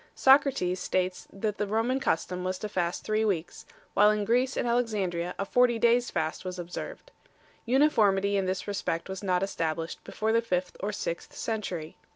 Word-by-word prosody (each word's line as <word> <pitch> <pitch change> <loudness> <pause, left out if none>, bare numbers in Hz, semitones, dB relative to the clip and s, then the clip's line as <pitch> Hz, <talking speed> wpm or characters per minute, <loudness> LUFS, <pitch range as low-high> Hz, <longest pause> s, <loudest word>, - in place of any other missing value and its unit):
Socrates 265 -10 +4
5 - - -3
states 185 0 -1
that 205 +1 -3
the 210 - 0
Roman 225 +5 +1
custom 180 -5 -1
was 185 0 -2
to 215 - -4
fast 180 -4 -2
three 215 +1 +1
weeks, 175 -6 -2 0.3
while 210 +1 +6
in 210 -1 +1
Greece 250 +4 +1
and - - 0
Alexandria 200 -8 0
a 195 - -2
forty 245 +2 +3
days 235 +2 +3
fast 160 +1 -2
was 185 -1 -5
observed. 180 - -7 0.6
Uniformity 210 -7 +3
in 195 -1 +1
this 185 +1 -2
respect 195 -4 -2
was 190 0 -5
not 185 -2 +1
established 165 -3 -3
before 220 +1 -2
the 230 - +4
fifth 180 -5 -2
or 205 +2 -2
sixth 170 -4 -5
century. 185 -8 -4
200 Hz, 180 wpm, -28 LUFS, 180-230 Hz, 0.6 s, while